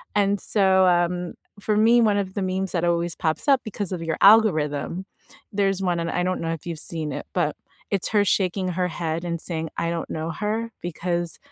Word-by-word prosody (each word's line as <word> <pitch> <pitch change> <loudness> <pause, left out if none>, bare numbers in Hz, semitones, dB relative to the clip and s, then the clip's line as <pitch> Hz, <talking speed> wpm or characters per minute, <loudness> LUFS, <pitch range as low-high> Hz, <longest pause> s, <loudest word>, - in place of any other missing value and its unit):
And 200 -1 +2
so, 190 -2 +4
um, 175 0 +1 0.3
for 210 +1 0
me, 230 +3 +5
one 210 -3 +3
of 190 -2 -3
the 200 - -1
memes 190 0 -1
that 175 -1 0
always 170 -1 0
pops 160 - -1
up 275 -2 +5
because 205 -3 -3
of 180 -3 -3
your 160 -1 -2
algorithm, 185 -5 +4 0.5
there's 195 -1 +1
one- 175 -2 0
and 165 0 -2
I 180 - 0
don't 185 0 -1
know 165 0 -1
if 165 - -8
you've 170 -3 -5
seen 160 -2 -1
it- - - -5
but 170 -5 0 0.4
it's 195 -3 0
her 205 -2 +3
shaking 185 -1 +1
her 180 0 -1
head 165 0 -3
and 170 -1 -3
saying, 160 -2 -2
"I 170 - -1
don't 170 -1 -4
know 160 +1 -3
her," 220 +5 -3
because 175 0 -3
180 Hz, 210 wpm, -24 LUFS, 170-200 Hz, 0.5 s, me